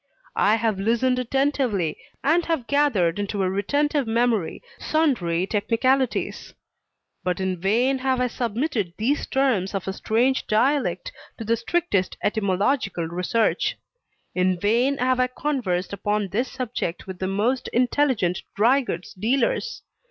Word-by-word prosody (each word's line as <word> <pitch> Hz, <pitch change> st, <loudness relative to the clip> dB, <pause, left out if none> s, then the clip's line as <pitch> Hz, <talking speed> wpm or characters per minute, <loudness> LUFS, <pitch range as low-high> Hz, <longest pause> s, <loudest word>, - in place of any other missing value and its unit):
I 210 Hz, +2 st, +5 dB
have 220 Hz, -3 st, 0 dB
listened 235 Hz, +5 st, +1 dB
attentively, 250 Hz, -, 0 dB, 0.3 s
and 330 Hz, +4 st, +3 dB
have 320 Hz, -8 st, -1 dB
gathered 225 Hz, -, +2 dB
into 200 Hz, -1 st, -1 dB
a 185 Hz, -, +1 dB
retentive 285 Hz, +7 st, 0 dB
memory 225 Hz, -, 0 dB, 0.2 s
sundry 200 Hz, -, +1 dB
technicalities; 235 Hz, +5 st, 0 dB, 0.7 s
but 180 Hz, 0 st, -1 dB
in 190 Hz, -2 st, -2 dB
vain 245 Hz, +8 st, +2 dB
have 260 Hz, 0 st, 0 dB
I 250 Hz, -, +2 dB
submitted 235 Hz, -, -2 dB
these 260 Hz, +7 st, 0 dB
terms 235 Hz, -9 st, +1 dB
of 195 Hz, -1 st, -3 dB
a 190 Hz, -, -1 dB
strange 245 Hz, +6 st, +1 dB
dialect 275 Hz, -, +1 dB, 0.3 s
to 225 Hz, -, -6 dB
the 230 Hz, +2 st, +2 dB
strictest 230 Hz, -, -1 dB
etymological 200 Hz, -1 st, 0 dB
research. 180 Hz, +6 st, 0 dB, 0.6 s
In 185 Hz, -1 st, +1 dB
vain 240 Hz, +8 st, +2 dB
have 255 Hz, 0 st, +1 dB
I 255 Hz, -, +3 dB
conversed 245 Hz, -10 st, -2 dB
upon 205 Hz, 0 st, -1 dB
this 240 Hz, +7 st, -1 dB
subject 245 Hz, -9 st, -4 dB
with 190 Hz, -2 st, -8 dB
the 185 Hz, -, -1 dB
most 220 Hz, +7 st, 0 dB
intelligent 245 Hz, -7 st, +1 dB
dry 240 Hz, +7 st, +4 dB
goods 180 Hz, -8 st, -5 dB
dealers. 270 Hz, -, 0 dB
230 Hz, 135 wpm, -24 LUFS, 195-265 Hz, 0.7 s, I